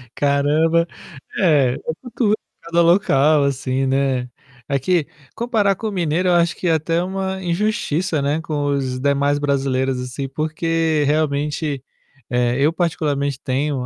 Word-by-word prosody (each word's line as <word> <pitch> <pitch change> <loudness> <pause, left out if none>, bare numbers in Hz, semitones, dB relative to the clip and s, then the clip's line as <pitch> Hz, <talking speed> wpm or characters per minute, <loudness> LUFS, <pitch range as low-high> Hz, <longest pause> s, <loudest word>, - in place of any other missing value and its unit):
Caramba. 150 +4 +2 0.5
É, 145 -9 +4
é - - -5 0.4
cultu 215 -4 +2 0.3
cada 170 +1 +1
local, 155 -5 +4
assim, 135 -1 -1
né. 130 -2 0 0.4
Aqui, 145 +4 +1 0.3
comparar 220 -4 +1
com 220 +3 -4
o - - -6
mineiro 180 -1 0
eu - - +4
acho 170 0 +2
que 180 - -3
é 165 - +4
até 165 +2 0
uma 190 0 -3
injustiça, 175 -3 0
né, 145 +3 0
com 150 -3 -2
os 130 -3 -1
demais 140 +1 +1
brasileiros, 135 -2 0
assim, 125 +2 -5
porque, 155 +1 0
realmente, 145 -1 -1 0.5
eh, 125 -1 +1
eu, 145 +3 +3
particularmente, 145 -5 -1
tenho 135 0 -1
150 Hz, 140 wpm, -20 LUFS, 140-170 Hz, 0.5 s, É